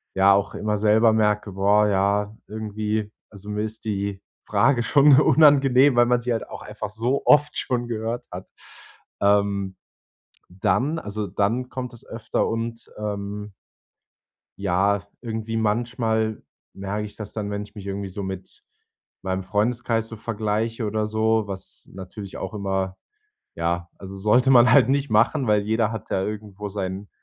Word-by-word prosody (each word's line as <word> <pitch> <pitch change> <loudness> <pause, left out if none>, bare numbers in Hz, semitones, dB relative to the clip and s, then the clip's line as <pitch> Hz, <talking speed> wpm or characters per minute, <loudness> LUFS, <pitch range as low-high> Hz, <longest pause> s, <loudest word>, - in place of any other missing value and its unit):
ja 95 +1 +6
auch 100 0 +1
immer 105 0 -1
selber 110 +2 +4
merke: 105 -2 +1
„Boah, 100 +2 +3
ja, 100 +1 +1
irgendwie 110 0 -3 0.2
also, 100 0 -12
mir 105 0 -2
ist 110 +1 -6
die 100 -2 -3 0.2
Frage 120 +4 +2
schon 140 0 +6
unangenehm, 140 -3 +5
weil 120 0 +6
man 120 0 +2
sie 120 +1 -2
halt 115 - -3
auch - - -8
einfach 105 0 -6
so 115 +6 -1
oft 145 0 +4
schon 120 -2 -1
gehört 115 +1 -3
hat." 90 +2 -8 0.7
Ähm, 100 -1 +2 0.8
dann 100 - 0
also, 105 -6 -4
dann 115 +6 -1
kommt 125 -1 -5
es 120 - -14
öfter 115 0 -2
und, 115 0 -4
ähm 105 0 -5 1.1
ja, 100 +1 +1
irgendwie 115 -1 -4
manchmal 110 0 0 0.3
merke 100 +2 -4
ich 105 - -9
das 105 -2 -8
dann, 105 -2 -4
wenn 100 0 -3
ich 105 +1 -13
mich 100 -1 -8
irgendwie 100 0 -4
so 100 +1 -6
mit 95 -1 -8 0.6
meinem 95 0 -2
Freundeskreis 115 +2 0
so 115 - -8
vergleiche 110 +1 -2
oder 105 0 -1
so, 110 0 +1
was 95 -1 -8
natürlich 95 +1 -8
auch 95 - -5
immer 95 -2 -2 0.6
ja, 85 +1 -2
also, 95 0 -9
sollte 120 +7 +3
man 125 -1 +7
halt 135 -3 +6
nicht 140 0 +1
machen, 115 +5 +2
weil 105 -1 +3
jeder 110 +1 +1
hat 110 -4 -7
ja 95 - +1
irgendwo 105 -1 -6
sein 95 0 -5
105 Hz, 155 wpm, -23 LUFS, 100-115 Hz, 1.1 s, man